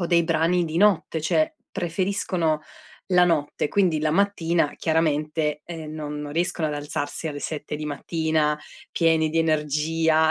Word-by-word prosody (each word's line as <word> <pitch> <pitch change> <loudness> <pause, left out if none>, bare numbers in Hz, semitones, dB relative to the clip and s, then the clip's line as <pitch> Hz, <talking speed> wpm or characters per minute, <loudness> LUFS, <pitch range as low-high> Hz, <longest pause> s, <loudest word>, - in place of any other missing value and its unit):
o 175 - 0
dei 170 -1 +4
brani 165 +2 +2
di 160 0 -4
notte, 185 -5 +3
cioè 310 - +1 0.2
preferiscono 175 -3 0 0.5
la 180 -1 +5
notte, 150 -4 0
quindi 175 -5 +2
la 155 0 +1
mattina 170 -4 +1
chiaramente, 155 -1 0
ehm, 160 -3 -7
non 150 -1 -5
non 145 -1 -6
riescono 165 -1 0
ad 150 - -3
alzarsi 145 +2 -3
alle 145 -1 -5
7 150 -1 -4
di 150 - -5
mattina 150 0 0 0.3
pieni 160 -2 +3
di 165 +1 -1
energia. 160 +1 +2
160 Hz, 150 wpm, -24 LUFS, 150-170 Hz, 0.5 s, la